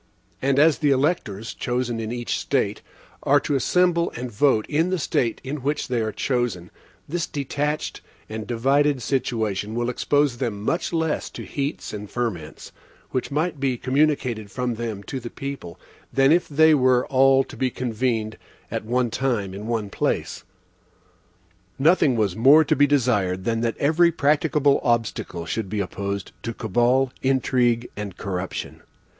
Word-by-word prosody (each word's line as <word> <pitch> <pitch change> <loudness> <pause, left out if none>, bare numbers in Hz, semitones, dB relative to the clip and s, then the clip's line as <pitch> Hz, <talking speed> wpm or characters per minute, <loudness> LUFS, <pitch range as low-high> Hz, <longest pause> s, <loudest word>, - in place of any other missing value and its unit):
And 135 0 +1
as 150 +1 +5
the 150 - +2
electors, 130 - 0
chosen 120 -2 -2
in 110 0 -4
each 120 0 -2
State, - - -1 0.4
are 145 +1 +4
to 145 - -2
assemble 170 +5 +2
and 125 +1 -5
vote 110 0 +2
in 160 +4 +1
the 185 - 0
State 125 -6 0
in 135 +3 -4
which 145 +1 -2
they 120 -2 0
are 110 0 -1
chosen, 120 -9 -2 0.4
this 170 +2 -2
detached 145 +2 -3 0.3
and 110 -1 -6
divided 135 +3 +2
situation 110 -5 -1
will 120 +1 0
expose 145 -1 +1
them 115 -5 -2
much 165 +10 -1
less 160 -2 -1
to - - -8
heats 140 -3 -4
and 105 -1 -6
ferments, 110 -11 -4 0.4
which 130 - -2
might 155 +2 -1
be 130 -2 0
communicated 130 -5 0
from 125 +2 -2
them 110 -3 -5
to 135 - -5
the 120 -1 -7
people, 135 -12 -7 0.3
than 135 +1 +4
if 175 +2 +3
they 160 +2 +5
were 130 -3 +3
all 135 0 +4
to - - -12
be 130 - 0
convened 115 -3 -2 0.3
at - - -2
one 120 +1 0
time, 110 -8 -1
in 105 +3 -7
one 110 -4 -2
place. - - -2 1.3
Nothing 150 -2 +4
was 105 -5 0
more 140 +7 +7
to - - +1
be 145 +1 +4
desired 105 -10 +1
than 115 +2 0
that 115 -1 -1
every 160 +4 +3
practicable 145 -1 +2
obstacle 115 -8 -1
should 100 +4 -3
be 105 +1 -2
opposed 100 0 -4
to 115 -1 -5
cabal, 120 +4 +1
intrigue, 125 -3 +1
and 100 -3 -6
corruption. 95 -1 -5
125 Hz, 160 wpm, -23 LUFS, 110-145 Hz, 1.3 s, more